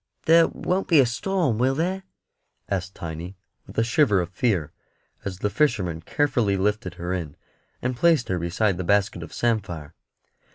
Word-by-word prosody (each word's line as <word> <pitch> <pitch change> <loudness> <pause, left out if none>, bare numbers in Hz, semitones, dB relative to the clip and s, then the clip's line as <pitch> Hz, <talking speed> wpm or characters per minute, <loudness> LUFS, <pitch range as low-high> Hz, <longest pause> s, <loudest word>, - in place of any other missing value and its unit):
"There 165 0 +6
won't 185 +2 -2
be 165 -4 +5
a 135 - +6
storm, 135 - 0
will 130 +2 +2
there?" 185 +5 -1 0.7
asked 95 -1 -3
Tiny, 85 +3 -7 0.3
with - - -13
a 115 - +4
shiver 115 -3 +3
of 90 0 -3
fear, 95 - 0 0.5
as 95 -2 -4
the 105 - -1
fisherman 100 - +1
carefully 115 - +1
lifted 95 -2 -1
her 90 +1 -3
in 85 -6 -4 0.5
and 130 0 -1
placed 160 -2 +3
her 90 -1 0
beside 90 +3 0
the 90 - -3
basket 100 +3 +1
of - - -8
samphire. 90 -10 -2
105 Hz, 165 wpm, -24 LUFS, 90-130 Hz, 0.7 s, There